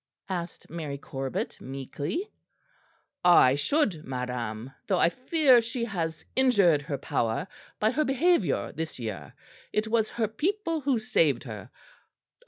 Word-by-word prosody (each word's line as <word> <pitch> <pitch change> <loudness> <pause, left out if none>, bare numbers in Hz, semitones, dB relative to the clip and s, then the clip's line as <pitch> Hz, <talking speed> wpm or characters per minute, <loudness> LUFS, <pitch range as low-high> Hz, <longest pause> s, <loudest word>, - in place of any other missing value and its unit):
asked 175 -2 -5
Mary 155 -4 -5
Corbet 135 -1 -4
meekly. 140 - -4 1.0
"I 175 -7 +7
should, 170 - +1
madam; 125 -2 -4 0.2
though 190 - +2
I 170 - +4
fear 260 - +4
she 230 +1 -3
has 165 -7 -3
injured 200 - +4
her 140 0 -4
power 130 +1 -1 0.3
by 215 +1 +3
her 305 +4 +1
behaviour 270 - +2
this 160 0 -5
year. 100 - -6 0.4
It 215 +1 0
was 220 -1 +1
her 230 -2 -1
people 330 - -1
who 270 -2 +2
saved 155 - +2
her. 110 -3 -8
170 Hz, 130 wpm, -28 LUFS, -, 1.0 s, I